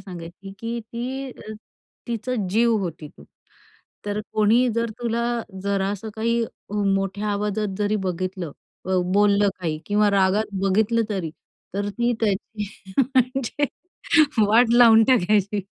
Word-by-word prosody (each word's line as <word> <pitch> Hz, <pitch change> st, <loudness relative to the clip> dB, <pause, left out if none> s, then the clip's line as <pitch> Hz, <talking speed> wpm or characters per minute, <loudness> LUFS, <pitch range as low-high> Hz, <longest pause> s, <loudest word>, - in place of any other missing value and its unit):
सांगायची, 180 Hz, +1 st, -9 dB
की 230 Hz, +1 st, -4 dB
ती 250 Hz, +4 st, -5 dB
अ, 215 Hz, -, -10 dB, 0.6 s
तिचा 240 Hz, +2 st, -2 dB, 0.2 s
जीव 230 Hz, +2 st, +3 dB
होती 165 Hz, -5 st, -5 dB
तू. 70 Hz, -, -17 dB, 0.8 s
तर 205 Hz, +1 st, -1 dB
कोणी 225 Hz, +4 st, +3 dB
जर 230 Hz, 0 st, 0 dB
तुला 235 Hz, -1 st, -1 dB, 0.4 s
जरा 200 Hz, -1 st, 0 dB
असं 205 Hz, +2 st, -5 dB
काही 230 Hz, +1 st, 0 dB
अ, -, -, -8 dB, 0.5 s
मोठ्या 195 Hz, +2 st, -2 dB
आवाजात 205 Hz, -1 st, -2 dB
जरी 210 Hz, +1 st, +1 dB
बघितलं, 185 Hz, -3 st, -3 dB, 0.3 s
अ, 190 Hz, 0 st, 0 dB, 0.2 s
बोललं 205 Hz, 0 st, +4 dB
काही 155 Hz, -3 st, -2 dB
किंवा 205 Hz, 0 st, +3 dB
रागात 200 Hz, +2 st, +1 dB
बघितलं 220 Hz, +4 st, +2 dB
तरी, 190 Hz, -7 st, -3 dB, 0.4 s
तर 205 Hz, 0 st, -1 dB
ती 240 Hz, 0 st, +2 dB
त्याची 210 Hz, 0 st, -2 dB, 0.3 s
म्हणजे 260 Hz, +1 st, +1 dB, 0.8 s
वाट 230 Hz, +3 st, +4 dB
लावून 230 Hz, -2 st, +7 dB
टाकायची. 210 Hz, -4 st, +2 dB
210 Hz, 130 wpm, -23 LUFS, 195-230 Hz, 0.8 s, लावून